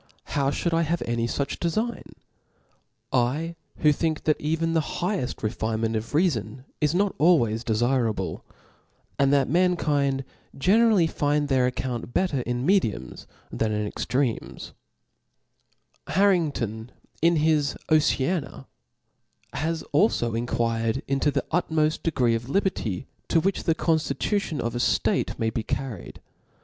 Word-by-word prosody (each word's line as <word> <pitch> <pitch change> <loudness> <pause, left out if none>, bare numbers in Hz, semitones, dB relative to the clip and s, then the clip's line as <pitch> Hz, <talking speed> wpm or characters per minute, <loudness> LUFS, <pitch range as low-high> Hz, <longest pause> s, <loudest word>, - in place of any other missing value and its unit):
How 140 -1 +2
ihould 170 +4 -1
I 165 - +3
hav« 170 +1 -1
any 115 0 -1
fuch 140 +3 -3
defign, 215 +8 -2 1.0
I 140 +7 0 0.3
who 150 - +6
think 155 +1 -1
that 155 - +1
even 165 +2 0
the 165 - +3 0.2
higheft 180 - -2
refinement 110 0 -1
of 110 +4 -4
reafon 130 - 0 0.2
is 150 +2 +2
not 200 +1 +2
always 120 -10 +3
defirable, 115 -6 0 0.8
and 140 0 +4
that 140 -2 +3
mankind 145 -5 +1 0.3
generally 205 +4 +4
find 145 -2 0
their 130 -2 +3
account 125 -1 -4
bet* 185 -1 +2
ter 140 - 0
in 125 +1 -2
mediums 115 - 0 0.2
than 110 -1 -1
in 105 0 -1
extremes 125 +3 -2 1.3
i - - -5
Harrington^ 145 - +1 0.3
in 170 +1 +4
his 150 -2 +2
Oceana^ 155 -1 +1 0.9
has 160 +1 -2
alfo 140 - +2
enquired 115 0 -1
into 135 +2 +1
the 140 -1 -1
utmoft 160 -3 +1
degree 130 -8 +1
of 115 +2 -3
liberty, 140 - -1 0.2
to 165 - +3
which 195 +4 -1
the 165 - +2
conftitu 165 +6 0
tion 155 -6 -4
of 115 - -2
a 120 - -2
ftate - - +1
may 110 0 0
be 115 - -2
carried. 120 -3 -5
140 Hz, 135 wpm, -25 LUFS, 120-165 Hz, 1.3 s, who